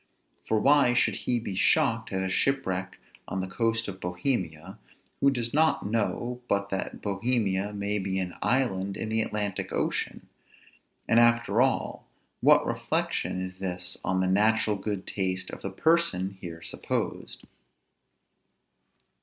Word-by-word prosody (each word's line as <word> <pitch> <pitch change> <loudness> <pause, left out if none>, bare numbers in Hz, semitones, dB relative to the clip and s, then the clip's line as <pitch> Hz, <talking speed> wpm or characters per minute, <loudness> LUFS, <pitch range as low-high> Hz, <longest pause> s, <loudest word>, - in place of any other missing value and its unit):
For 110 - +2
why 140 -1 +5
should - - +3
he 120 -1 -1
be 105 -3 -5
shocked 95 - +2
at 95 0 -1
a - - -1
shipwreck 95 -4 -1 0.3
on 95 - -3
the 95 - -2
coast 115 +3 0
of 95 -1 -6
Bohemia, 90 - -3 0.4
who 140 - +5
does 120 -3 -2
not 160 -5 +3
know 115 +3 -1
but 100 0 0
that 95 - -4
Bohemia 105 -1 0
may 105 0 -1
be 95 0 -2
an 90 -2 -2
island 100 -7 0
in 110 - -3
the 110 0 +1
Atlantic 105 -3 -2
ocean? - - -2 0.8
and 115 - +5
after 120 -1 +4
all, 135 +1 0 0.3
what - - +5
reflection 95 - -1
is 95 0 -6
this 90 -1 -1
on 95 +1 +1
the 95 - +1
natural 105 +2 +3
good 100 -1 -4
taste 95 -2 -2
of - - -8
the 95 - -3
person 100 - +2
here 85 -2 -7
supposed? - - -4
100 Hz, 145 wpm, -28 LUFS, 95-115 Hz, 0.8 s, why